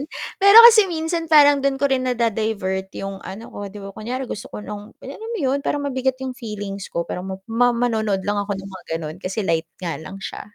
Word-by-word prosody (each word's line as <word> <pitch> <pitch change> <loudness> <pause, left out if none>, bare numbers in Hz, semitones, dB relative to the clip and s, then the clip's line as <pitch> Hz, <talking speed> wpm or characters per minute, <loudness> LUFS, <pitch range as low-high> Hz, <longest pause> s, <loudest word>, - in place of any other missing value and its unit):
ganon 285 - -4 0.3
pero 400 +2 +7
kasi 440 -3 +6
minsan 330 0 -2
parang 290 -2 +7
dun 275 0 0
ko 280 - +3
rin 260 -1 +1
na-da-divert 215 -5 -1
yung 195 0 -5
ano 200 +5 -9
ko, 205 0 -6
di 205 +1 -11
ba, 195 - -8
kunyari 250 +6 -4
gusto 210 - -6
ko - - -8
ng 210 -1 -6 0.2
alam 445 +1 -8
mo 465 - -3
yun, 275 -1 0
parang 290 0 -1
mabigat 260 -1 -1
yung 260 - -3
feelings 205 -5 -6
ko. 170 0 -2
Parang 180 +2 -5
ma 190 - -4
ma 245 +2 +3 0.2
manonood 215 -4 -1
lang 205 0 0
ako 200 0 -3
ng 195 0 -8
mga 185 -2 -11
ganon 155 -1 -6
kasi 195 +2 -3
light 165 -1 0
nga 175 -3 -3
lang 185 +5 -9
siya, - - -6
220 Hz, 230 wpm, -21 LUFS, 195-270 Hz, 0.3 s, pero